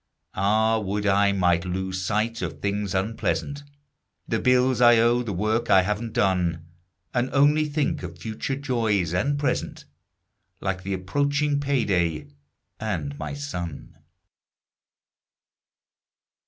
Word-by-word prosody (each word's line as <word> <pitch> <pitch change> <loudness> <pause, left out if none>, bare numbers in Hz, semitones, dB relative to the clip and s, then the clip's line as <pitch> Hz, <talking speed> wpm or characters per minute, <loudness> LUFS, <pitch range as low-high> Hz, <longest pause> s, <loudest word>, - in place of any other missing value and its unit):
Ah, 110 +3 +2
would 105 0 -2
I 100 0 +4
might 90 -3 +2
lose 95 +1 -3
sight 110 +5 -1
of - - -4
things 100 -1 -2
unpleasant: 115 +8 -1 0.7
The - - 0
bills 125 -1 +3
I 120 -1 +7
owe; 120 +2 +3
the 115 -4 -4
work 110 +5 -1
I 95 -2 +6
haven't 105 +4 -3
done. 90 -4 +1 0.5
And 125 +1 0
only 150 +2 +4
think 150 -1 -1
of 90 -1 -7
future 110 +7 -4
joys 115 - 0
and 140 +11 +1
present, 145 - -2 0.7
Like 95 -1 -2
the 95 +1 -3
approaching 145 +9 0
payday, 90 - 0 0.5
and 85 -10 -3
my - - -4
son. 90 - -6
105 Hz, 120 wpm, -25 LUFS, 95-125 Hz, 0.7 s, I